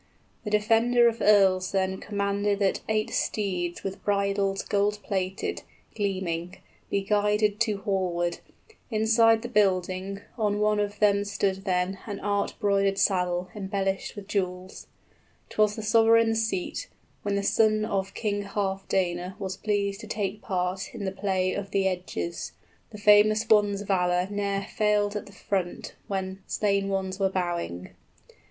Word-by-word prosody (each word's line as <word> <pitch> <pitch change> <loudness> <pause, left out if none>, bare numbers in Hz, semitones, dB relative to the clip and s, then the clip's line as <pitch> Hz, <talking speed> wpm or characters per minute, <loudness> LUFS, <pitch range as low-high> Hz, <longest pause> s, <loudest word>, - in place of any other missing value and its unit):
The 210 - -4
defender 225 +3 +4
of 230 0 -1
earls 190 -3 +4
then 190 -1 0
Commanded 200 0 -1
that 195 -1 +1
eight 215 0 0
steeds 180 -4 -2
with 195 +1 -5
bridles 200 -1 0
45 - - -17
Gold 205 +1 +1
plated, 190 0 -2 0.3
gleaming, 185 -4 -2 0.3
be 200 - 0
guided 210 0 +1
to 215 -4 0
hallward, 175 -3 -1 0.5
Inside 225 0 +4
the - - -3
building; 195 -2 0 0.2
on 210 -1 +1
one 210 0 +2
of 205 0 -2
them 205 -1 +3
stood 200 -1 -1
then 185 0 0
An 205 -2 -4
art 200 0 -1
broidered 200 -1 +2
saddle 180 -2 +1
embellished 195 -1 -2
with 205 -2 -9
jewels; 185 -2 -3 0.6
'Twas 210 -1 +2
the 220 - -6
sovereign's 225 +1 +4
seat, 190 - -3 0.3
when 205 -1 -1
the 200 - 0
son 215 +1 +3
of 195 -2 -2
King 205 -2 -1
Healfdene 190 -2 -1
Was 190 -2 -4
pleased 200 0 -1
to 220 - -9
take 210 -2 -3
part 185 +1 -2
in 210 -4 -4
the 190 - -1
play 190 -1 0
of 200 -1 -4
the 195 -1 +1
edges; 180 - -4 0.4
50 - - -10
The 205 - -14
famous 210 +1 +5
one's 205 -2 +3
valor 180 -2 +1
ne'er 200 -1 -1
failed 210 0 +1
at 210 - -4
the - - -12
front 190 -2 -3
when 190 -1 -3
Slain 200 -1 0
ones 190 0 -2
were 195 -1 +2
bowing. 175 - -3
200 Hz, 150 wpm, -27 LUFS, 190-210 Hz, 0.6 s, famous